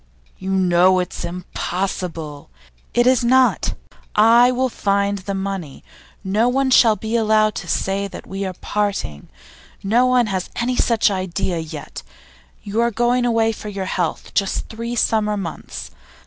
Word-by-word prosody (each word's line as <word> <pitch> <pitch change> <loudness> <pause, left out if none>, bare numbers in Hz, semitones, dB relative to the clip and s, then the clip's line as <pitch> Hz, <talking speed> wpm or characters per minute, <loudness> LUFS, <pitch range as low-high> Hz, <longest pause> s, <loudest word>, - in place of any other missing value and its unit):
'You 190 - -5
know 185 -1 +4
it's 180 -1 -3
impossible 175 -3 -4 0.2
' - - -35
'It 240 - +4
is 255 -1 +4
not! 255 +1 +3 0.4
I 235 +3 +6
will 255 +1 +1
find 200 -3 -1
money. 190 -6 -5 0.4
No 210 +5 +2
one 265 +1 +1
shall 230 -3 +6
be 220 +2 -4
allowed 215 -1 +3
to - - -12
say 195 +1 -1
that - - -10
we 195 +1 -5
are 190 -1 -3
parting; 200 - -2 0.5
no 235 +6 +3
one 250 -1 +3
has 190 -3 -3
any 245 +1 -1
such 230 -4 +2
idea 185 -2 -2
yet. 160 -1 -7 0.6
You 210 +2 -1
are 235 - +3
going 240 +2 +1
away 225 -1 +2
for 215 -1 -7
your 195 -2 -4
health, 180 -3 -3
just 195 -1 -1
three 230 +2 -5
summer 215 -2 +1
months. 150 - -6
200 Hz, 150 wpm, -20 LUFS, 185-235 Hz, 0.6 s, I